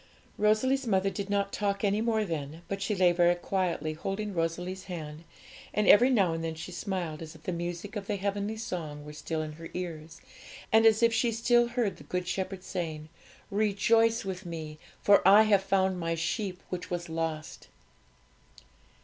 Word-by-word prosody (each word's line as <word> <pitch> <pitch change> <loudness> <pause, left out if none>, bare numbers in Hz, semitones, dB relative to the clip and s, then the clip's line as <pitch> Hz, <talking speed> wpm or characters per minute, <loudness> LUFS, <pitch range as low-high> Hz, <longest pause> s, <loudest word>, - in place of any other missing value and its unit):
Rosalie's 245 +5 +2
mother 195 -2 +2
did 200 -1 -5
not 200 -1 0
talk 200 -1 -1
any 205 +1 +2
more 220 -2 +1
then; 160 -1 -5
but 195 0 -4
she 210 +1 0
lay 180 -2 +5
very 175 0 +4
quietly, 175 -3 -1
holding 195 +6 -4
Rosalie's 180 +3 -2
hand, 160 -3 -7 0.5
and 210 - +2
every 245 +5 +7
now 195 -10 +3
and 165 0 -3
then 165 -1 -3
she 165 +3 -7
smiled, 175 -4 -4
as 160 0 -8
if 160 - -16
the - - -2
music 175 +4 -5
of 200 -2 -5
the 210 - 0
heavenly 200 +2 -2
song 155 -9 -5
were 150 - -9
still 155 +1 -3
in 155 - -6
her 165 +2 -10
ears, 165 -3 -6 0.5
and 225 0 +7
as 220 +1 +4
if 230 0 +5
she 230 +1 +2
still 240 +1 +3
heard 240 -4 -1
the - - -13
Good 180 0 -3
Shepherd 185 0 -3
saying, 160 -5 -4 0.4
'Rejoice 225 +2 +2
with 190 0 -4
Me, 160 -3 -7 0.2
for 205 0 +6
I 200 +3 +8
have 205 -3 +4
found 190 -1 +1
My 165 -1 -1
sheep 180 +3 -3
which 180 -1 -5
was 175 0 -3
lost.' 160 -1 -4
185 Hz, 185 wpm, -29 LUFS, 165-210 Hz, 0.5 s, I